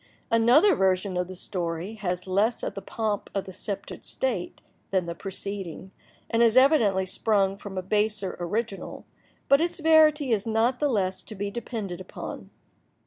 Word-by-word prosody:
Another 245 - +5
version 190 - +1
of 180 0 -1
the 185 - -8
story 175 +1 -4
has 180 -4 -3
less 205 +5 +1
of - - -2
"the 195 - -6
pomp 210 +1 -3
of 195 - -1
sceptred 200 +1 -6
state" 230 -10 -3 0.3
than 190 -2 +1
the 170 - -4
preceding, 190 0 -6 0.4
and 230 - +1
has 230 +1 +5
evidently 235 -9 +5
sprung 195 0 +1
from 200 -1 -8
a 185 - -2
baser 210 0 0
original, 195 +2 -4 0.4
but 275 +2 +5
its 345 +1 0
verity 310 -3 +5
is 215 -1 +1
not 230 +3 +1
the 295 - +2
less 190 -5 0
to 215 - -10
be 200 +1 -3
depended 205 -6 -5
upon. - - -8
205 Hz, 160 wpm, -26 LUFS, 185-230 Hz, 0.4 s, Another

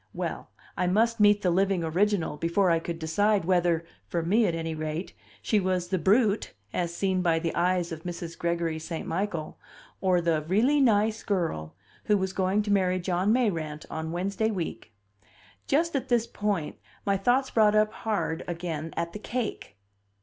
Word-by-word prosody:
Well, - - -4 0.3
I 180 - 0
must 225 +5 +2
meet 205 0 +5
the 180 - +3
living 190 0 +2
original 180 +1 +1
before 170 +4 +2
I 165 - +3
could 165 0 -5
decide 195 +5 +1
whether 175 -2 +2 0.2
(for 170 -1 -1
me, 210 +7 +3
at 170 - 0
any 165 0 -3
rate) 155 +3 -4 0.3
she 215 - +2
was 185 -2 -1
the 185 -1 0
"brute" 205 +4 +2 0.2
as 175 -2 -1
seen 185 +1 0
by 170 -2 +2
the 165 0 -2
eyes 175 0 +1
of 160 -1 -6
Mrs. 170 -1 -6
Gregory 170 -1 -1
St. 160 +1 -5
Michael, 170 -2 -3 0.4
or 185 -2 +3
the 165 -2 +1
"really 245 - +3
nice 220 -3 +3
girl" 165 - -2 0.3
who 210 - +3
was 190 -1 -2
going 190 +2 +1
to 205 - -2
marry 185 -2 +2
John 180 +3 +1
Mayrant 165 -11 0
on 160 0 -4
Wednesday 195 +5 -1
week. 175 - -4 0.8
Just 330 +3 +1
at 270 - -2
this 240 -2 +3
point 205 -9 -2 0.3
my 200 -1 +2
thoughts 245 +7 +2
brought 215 -2 +4
up 215 0 +3
hard 210 -7 -2
again 165 -2 -4
at 170 0 -2
the 210 - -6
cake. 225 - -4
185 Hz, 175 wpm, -27 LUFS, 165-210 Hz, 0.8 s, meet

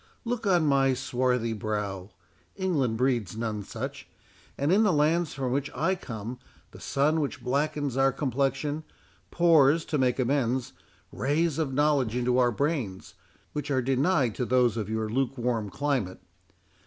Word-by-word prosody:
Look 235 -2 -2
on 175 -4 +3
my 135 -2 +3
swarthy 125 -3 0
brow—England 105 - -3
breeds 120 -5 0
none 110 -2 -2
such—and 140 - -6
in 205 - +5
the 210 -3 +4
lands 160 +2 +1
from 130 -3 -2
which 140 +2 -1
I 165 +8 +1
come, 120 - -6 0.3
the - - -13
sun 150 +3 +1
which 145 - -4
blackens 140 0 -1
our 135 0 +4
complexion, 140 +3 -1 0.5
pours, 165 -2 +4
to 150 - -1
make 125 -2 +2
amends, 130 -1 0 0.4
rays 155 +3 0
of 150 -4 0
knowledge 140 -4 +2
into 125 0 +1
our 125 -1 +4
brains, 125 - -2 0.4
which 150 -1 -4
are 130 -3 +1
denied 135 - +2
to 125 - 0
those 125 -2 +3
of 110 -3 -3
your 110 0 -1
lukewarm 120 -2 -1
climate. 130 -7 -1
135 Hz, 140 wpm, -27 LUFS, 120-150 Hz, 0.5 s, in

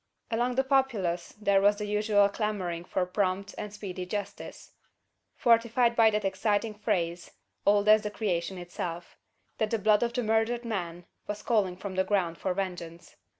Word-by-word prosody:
Among 240 +2 0
the 265 - +3
populace 235 -11 0
there 200 -2 +3
was 205 +1 +5
the 210 0 -4
usual 210 -1 +3
clamouring 200 -5 -3
for 185 0 -1
prompt 190 +1 -1
and 210 - -6
speedy 190 -3 -6
justice; 205 +1 -6 0.6
fortified 235 0 +3
by 225 -1 +6
that 210 -1 -1
exciting 205 +3 0
phrase, 175 -4 -2 0.4
old 205 0 +4
as 215 0 +7
the 210 - -3
creation 190 -4 -2
itself: 175 -1 -6 0.4
"that 220 - +1
the 225 - +1
blood 210 0 +3
of 235 0 0
the 245 - -1
murdered 225 +2 +1
man 175 -6 -4 0.2
was 210 0 -5
calling 200 -6 +1
from 190 0 -6
the 190 0 +2
ground 180 -5 0
for 185 - -1
vengeance." 175 -3 -5
205 Hz, 165 wpm, -28 LUFS, 185-220 Hz, 0.6 s, as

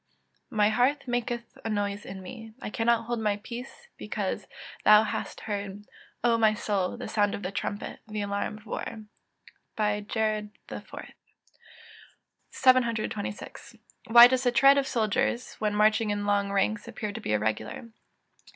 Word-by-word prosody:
[Verse: - - -8
"My 210 0 +5
heart 255 +5 +1
maketh 240 -1 -3
a 225 - -3
noise 205 -1 -2
in 190 0 -8
me: 225 +2 -10
I 210 - -6
cannot 230 0 +1
hold 240 0 -2
my 210 -2 0
peace, 245 - -9
because - - -3 0.4
thou 210 0 +8
hast 215 - -4
heard, 205 -1 -5 0.4
O 235 -1 +3
my 215 -1 +4
soul, 200 -1 -1
the 250 - -6
sound 205 -2 +1
of 205 - -8
the 185 - -3
trumpet, 205 +1 -4
the 215 -1 -4
alarm 200 +1 -2
of 215 - -17
war." 220 0 -5 0.7
JER. 210 0 0 0.2
IV.] - - -8 1.6
726. 230 -5 0 0.3
_Why 235 +1 +11
does 255 0 +1
the 245 - +3
tread 275 +3 +6
of 270 - -1
soldiers, 230 +1 0
when 210 -1 0
marching 215 +1 +3
in 205 0 -1
long 200 -1 +1
ranks, 205 +2 0
appear 215 -3 -5
to - - -7
be 105 - -1
irregular? 110 - -2
215 Hz, 150 wpm, -28 LUFS, 205-235 Hz, 1.6 s, Why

